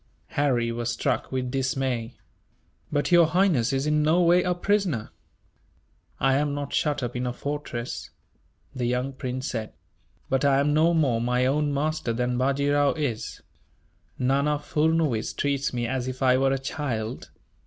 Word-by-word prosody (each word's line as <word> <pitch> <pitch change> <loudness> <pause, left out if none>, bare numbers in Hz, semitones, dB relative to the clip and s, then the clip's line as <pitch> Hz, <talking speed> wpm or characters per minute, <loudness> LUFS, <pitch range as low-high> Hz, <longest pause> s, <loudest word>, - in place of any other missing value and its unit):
Harry 125 -5 +1
was 120 0 -2
struck 115 - -1
with 130 -1 -2
dismay. 130 -3 -1 0.8
"But 145 +4 0
Your 170 -2 +7
Highness 165 - +2
is 135 +1 0
in 150 0 +2
no 155 +4 +3
way 175 +1 +5
a 180 0 0
prisoner!" 180 - 0 1.1
"I 135 0 +3
am 145 0 0
not 145 -1 -4
shut 145 -3 0
up 120 0 -4
in 125 0 -2
a - - -1
fortress," 140 -4 -5 0.6
the 125 -2 -2
young 125 +2 -1
prince 130 0 -4
said, 110 -2 -4 0.5
"but 135 0 0
I 140 -1 +4
am 145 +1 +2
no 165 +3 +4
more 130 -8 +2
my 125 +1 +1
own 145 +2 +1
master 150 -3 -1
than 125 +1 -1
Bajee 140 +2 +1
Rao 145 -1 +3
is. 140 -8 -3 0.8
Nana 140 +3 +1
Furnuwees 150 -5 0
treats 140 -1 0
me 120 -1 -2
as 130 +1 -2
if 130 +1 -4
I 130 -1 +5
were 135 +1 +2
a 135 - +1
child. 130 -4 -4
135 Hz, 165 wpm, -26 LUFS, 125-150 Hz, 1.1 s, Your